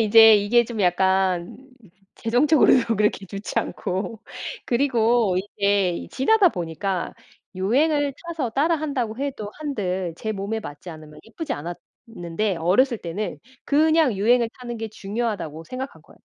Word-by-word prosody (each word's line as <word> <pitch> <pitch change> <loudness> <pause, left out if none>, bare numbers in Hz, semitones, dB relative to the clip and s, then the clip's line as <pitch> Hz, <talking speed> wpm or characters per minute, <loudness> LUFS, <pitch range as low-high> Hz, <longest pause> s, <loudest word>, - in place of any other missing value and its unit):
이제 225 0 +8
이게 225 +4 +3
좀 225 -2 -5
약간 185 -1 +1 0.6
재정적으로도 245 -2 +3
그렇게 210 -1 +1
좋지 200 +2 -4
않고 205 +5 -3 0.5
그리고 235 -6 +2 0.2
이제 200 -3 +1
지나다 390 +8 +4
보니까 175 - -3 0.4
유행을 280 +9 +1
타서 320 -8 -3
따라한다고 280 -5 0
해도 265 -7 -4
한들 190 - -3
제 220 0 -3
몸에 205 +3 -3
맞지 145 0 -9
않으면 155 -1 -12
예쁘지 285 +6 -5
않았는데 175 +3 -5
어렸을 215 +9 +2
때는 180 +5 -4 0.3
그냥 310 -3 +3
유행을 235 +4 +3
타는 240 -1 -6
게 225 - -4
중요하다고 200 -7 -4
생각한 260 +7 -7
거예요. - - -20
220 Hz, 310 characters per minute, -23 LUFS, 190-255 Hz, 0.6 s, 이제